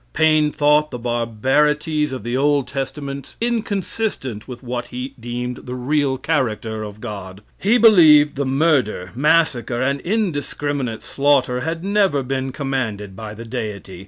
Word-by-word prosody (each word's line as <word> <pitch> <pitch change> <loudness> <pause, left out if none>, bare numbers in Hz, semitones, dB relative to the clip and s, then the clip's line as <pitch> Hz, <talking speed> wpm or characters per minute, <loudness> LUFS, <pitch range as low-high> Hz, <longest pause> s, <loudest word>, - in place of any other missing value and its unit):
Paine 155 -1 +3
thought 150 +1 +3
the 125 - -5
barbarities 135 +6 +1
of 130 -5 -5
the 120 +2 -2
Old 140 0 +2
Testament 140 0 -5
inconsistent 210 - -2
with 125 0 -9
what 120 -1 -4
he 125 +2 -6
deemed 120 +1 -4
the 125 - -4
real 135 +1 0
character 115 -7 -1
of 105 0 -7
God. 100 -3 -8 0.2
He 215 +5 +3
believed 160 -10 +7
the 140 - -2
murder, 130 - +1
massacre, 135 -3 +2
and 140 +2 0
indiscriminate 145 - -2
slaughter 135 -3 +2
had 165 +5 -3
never 195 -8 +2
been 130 +1 -2
commanded 125 -8 -3
by 105 0 -7
the 115 +2 -9
Deity. 105 -6 -6
135 Hz, 140 wpm, -20 LUFS, 120-150 Hz, 0.2 s, believed